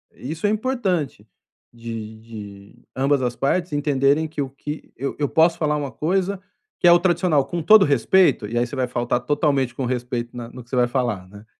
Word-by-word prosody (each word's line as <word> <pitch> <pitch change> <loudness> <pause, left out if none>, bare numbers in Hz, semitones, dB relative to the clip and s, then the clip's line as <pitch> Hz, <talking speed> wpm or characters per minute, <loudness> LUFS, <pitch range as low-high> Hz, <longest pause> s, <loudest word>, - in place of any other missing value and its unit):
Isso 160 +9 -3
é - - +2
importante 210 - -1 0.5
de 115 -2 -7
de 105 -3 -12
ambas 135 +1 +2
as 120 -1 -1
partes 170 +5 0
entenderem 145 +1 +2
que 155 -1 -5
o 135 - -3
que 150 +3 -8
eu 135 +2 -3
eu 145 -2 0
posso 165 +1 +4
falar 150 -2 0
uma 140 -2 -4
coisa 190 +4 -1 0.4
que - - +4
é - - +9
o - - +7
tradicional, 175 -6 +2
com 170 +5 -4
todo 210 +5 +7
o - - +3
respeito, 145 - +3
e 115 +3 -3
aí 120 - +2
você 120 - -13
vai 130 -1 0
faltar 120 0 -1
totalmente 140 -3 +1
com 135 - -3
o - - -1
respeito 120 -1 -3
na 120 -1 -7
no 125 0 -11
que 115 - -27
você 130 - -3
vai 125 0 +4
falar, 120 -7 -2
né. 100 +2 -14
135 Hz, 215 wpm, -22 LUFS, 120-160 Hz, 0.5 s, é